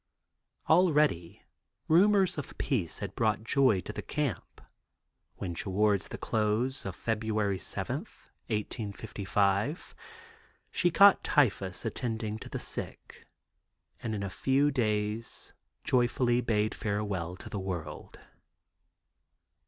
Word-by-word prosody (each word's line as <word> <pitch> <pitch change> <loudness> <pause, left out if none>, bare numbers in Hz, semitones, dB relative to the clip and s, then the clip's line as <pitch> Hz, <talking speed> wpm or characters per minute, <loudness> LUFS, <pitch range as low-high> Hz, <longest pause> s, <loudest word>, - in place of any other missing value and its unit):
Already 150 - +3 0.4
rumors 190 +1 +4
of 140 - -8
peace 100 - -1
had 100 -2 -5
brought 110 -2 0
joy 115 -4 +3
to - - -7
the 105 - -5
camp, 135 - -3 0.8
when 90 -3 -4
toward 100 +2 +1
the - - -7
close 110 +3 -1
of 95 - -5
February 110 -3 -1
7, - - -2 0.5
1855, 105 - -1 0.8
she 175 - +3
caught 200 +3 +6
typhus 100 -9 +1
attending 110 -3 -3
the - - -6
sick - - -5 0.7
and 110 -1 -3
in 100 - -3
a 100 - -3
few 140 +6 +2
days 110 -3 -1 0.3
joyfully 120 -1 +2
bade 110 -2 +1
farewell 100 -5 -2
to - - -9
the 100 - -4
world. 90 -5 -6
110 Hz, 105 wpm, -30 LUFS, 100-130 Hz, 0.8 s, caught